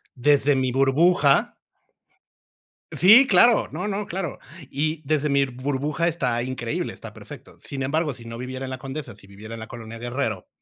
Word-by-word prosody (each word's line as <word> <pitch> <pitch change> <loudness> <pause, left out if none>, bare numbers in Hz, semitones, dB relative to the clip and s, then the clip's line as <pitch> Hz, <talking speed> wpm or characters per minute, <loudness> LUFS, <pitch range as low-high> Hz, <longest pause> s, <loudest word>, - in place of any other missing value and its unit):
Desde 145 +2 +3
mi 130 -1 0
burbuja 140 +3 +3 1.4
Sí, 220 +9 +7
claro, 240 -4 +5
no, 210 - -4
no, 205 0 -3
claro. 175 -5 -4 0.3
Y 155 +3 -2
desde 150 0 0
mi 140 0 +3
burbuja, 140 +5 -2
está 125 -8 -1
increíble, 120 -2 -3
está - - -11
perfecto. - - -12
Sin 135 -1 -5
embargo, 150 +1 -1
si 120 - -13
no 115 0 -8
viviera 130 +1 -5
en 130 - -6
la 130 - -5
Condesa, 135 -2 -7
si 100 - -17
viviera 105 +3 -11
en 115 - -7
la 110 - -8
Colonia 115 0 -9
Guerrero, 120 -5 -3
135 Hz, 170 wpm, -23 LUFS, 120-155 Hz, 1.4 s, Sí